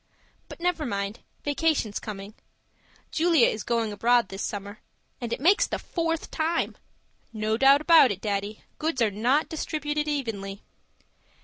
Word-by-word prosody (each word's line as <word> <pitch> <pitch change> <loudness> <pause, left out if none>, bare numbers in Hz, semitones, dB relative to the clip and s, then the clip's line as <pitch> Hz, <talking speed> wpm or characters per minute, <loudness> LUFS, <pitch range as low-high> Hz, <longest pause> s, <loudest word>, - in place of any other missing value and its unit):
But - - -10
never 345 -2 0
mind, 200 -2 -3 0.2
vacation's 290 -7 0
coming. 200 -1 -7 0.8
Julia 325 -5 +4
is 215 - 0
going 230 -2 0
abroad 235 0 +3
this 195 +1 -6
summer 205 0 -5 0.4
it 235 -1 -3
makes 360 +9 +4
the - - -2
fourth 330 -2 -3
time. 325 +2 -1 0.6
No 215 -1 -1
doubt 275 +4 +5
about 320 -4 +7
it, 195 - -4
Daddy, 205 0 -3 0.2
goods 315 -3 -1
are 215 - +2
not 245 +9 +1
distributed 300 -1 -2
evenly. 215 -9 -3
240 Hz, 135 wpm, -26 LUFS, 210-310 Hz, 0.8 s, about